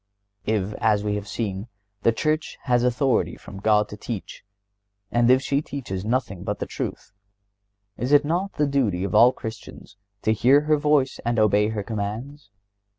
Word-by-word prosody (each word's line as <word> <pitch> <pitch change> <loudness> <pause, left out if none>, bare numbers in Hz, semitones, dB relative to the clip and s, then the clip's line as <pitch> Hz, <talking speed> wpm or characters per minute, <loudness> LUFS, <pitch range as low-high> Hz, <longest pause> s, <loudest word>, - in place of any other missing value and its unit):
If, 105 -2 0
as 105 -2 +2
we 105 -1 -1
have 105 0 -4
seen, 100 -1 -4 0.3
the 115 - +4
Church 155 +6 -1
has 125 -2 +2
authority 125 +1 +1
from 95 - -11
God 105 0 +3
to - - -7
teach, 110 -3 -7 0.7
and 120 0 +3
if 130 +1 +5
she 140 +2 +1
teaches 120 -11 -5
nothing 110 -5 -2
but 105 0 -2
the - - -3
truth, - - -6 0.9
is 125 +3 -2
it 145 0 +6
not 180 +6 -1
the 150 - +1
duty 125 -11 0
of 100 - -3
all 120 +2 +7
Christians 110 -4 -9 0.3
to 110 - +3
hear 130 +6 +5
her 150 0 +2
voice 145 -3 +2
and 120 0 0
obey 105 -1 +4
her 110 -2 -3
commands? 110 +5 -5
115 Hz, 170 wpm, -24 LUFS, 105-140 Hz, 0.9 s, all